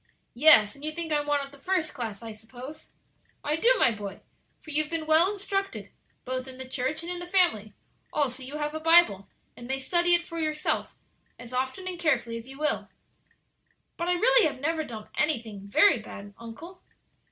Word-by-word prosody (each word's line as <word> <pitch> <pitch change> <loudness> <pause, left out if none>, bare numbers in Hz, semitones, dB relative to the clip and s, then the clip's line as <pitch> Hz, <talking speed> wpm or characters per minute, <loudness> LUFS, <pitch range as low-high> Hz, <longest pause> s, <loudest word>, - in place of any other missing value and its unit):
'" - - -47 0.2
"Yes; 215 -8 +7
and 280 - -15
you 310 - -1
think 325 0 -4
I'm 295 0 0
one 290 -1 +1
of 275 - -15
the 280 - -16
first 345 -1 -1
class, 225 -4 -6
I 225 - -7
suppose?" 245 +8 -11 0.5
"I 295 - 0
do, 460 +10 +3
my - - +5
boy; 205 -3 -7 0.4
for 310 - -11
you 300 +1 +2
have 305 - -6
been 325 -1 -3
well 320 +5 +5
instructed, 395 -1 -4 0.3
both 255 +1 -4
in 260 -1 -10
the 260 0 -7
church 265 +5 -2
and 345 - -5
in 355 - -3
the 350 - -6
family; 305 - +2 0.4
also 270 -3 -1
you 270 +3 -6
have 295 0 -3
a 315 - -4
Bible, 325 - +5 0.3
and 240 - -11
may 265 +1 -1
study 345 +6 +4
it 345 - 0
for 335 -1 -7
yourself 305 -1 -1 0.4
as 245 0 -11
often 260 +9 -3
and 360 -2 -4
carefully 240 -8 0
as 230 +1 -10
you 270 +1 -11
will." 300 +1 -1 1.1
"But 340 - -4
I - - +3
really 465 +3 +5
have 290 - -6
never 315 +3 -1
done 220 -6 -9
anything 225 -10 -1
very 270 - +4
bad, 205 -1 -11
uncle." 315 +11 -11
295 Hz, 205 wpm, -27 LUFS, 245-335 Hz, 1.1 s, Yes